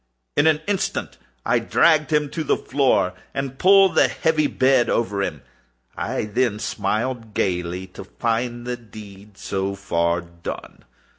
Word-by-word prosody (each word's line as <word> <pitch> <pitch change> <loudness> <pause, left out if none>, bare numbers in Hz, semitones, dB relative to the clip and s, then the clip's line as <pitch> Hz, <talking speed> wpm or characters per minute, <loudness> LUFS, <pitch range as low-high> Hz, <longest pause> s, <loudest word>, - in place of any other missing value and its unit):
In 155 - +4
an 155 -1 +3
instant 200 -2 -2 0.3
I - - +3
dragged 155 -1 +3
him 150 -2 +1
to 160 - -3
the - - +1
floor, 130 -10 +1 0.2
and 135 -1 -4
pulled 195 0 +6
the - - +5
heavy 155 -2 +1
bed 130 -3 +3
over 100 -3 0
him. - - -3 0.5
I - - -2
then 105 +1 0
smiled 115 +1 -2
gaily, 90 0 -1
to 95 - -9
find 120 +3 -2
the 125 0 -3
deed 105 -3 -13
so 95 0 -3
far 85 -3 0
done. 85 0 -9
115 Hz, 145 wpm, -22 LUFS, 100-140 Hz, 0.5 s, pulled